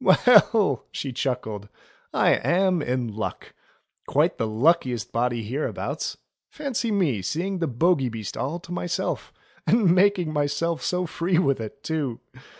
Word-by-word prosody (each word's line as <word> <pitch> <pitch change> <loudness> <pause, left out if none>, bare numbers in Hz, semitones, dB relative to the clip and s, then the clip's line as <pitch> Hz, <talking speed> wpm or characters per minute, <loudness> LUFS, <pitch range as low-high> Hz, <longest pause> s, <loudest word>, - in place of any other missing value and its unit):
"Well 210 - +5
!" - - -46
she 135 -2 -4
chuckled, 110 -6 -3 0.4
"I - - +3
am 185 -1 +2
in 125 -3 -1
luck! 110 - -5 0.5
Quite - - +1
the 115 - 0
luckiest 125 -1 +1
body 120 -1 0
hereabouts. 130 +8 -3 0.3
Fancy 265 -6 -3
my 170 - +1
seeing 180 - -2
the 165 - 0
Bogey 135 +1 +2
Beast 110 -4 -6
all 155 +6 -3
to 180 -1 -12
myself; 175 0 -3 0.4
and 210 -7 +4
making 185 -4 +3
myself 150 +3 0
so 180 0 -1
free 170 +1 0
with 140 -8 +2
it 110 +6 -8
too 150 -7 -2
155 Hz, 145 wpm, -25 LUFS, 125-180 Hz, 0.5 s, Well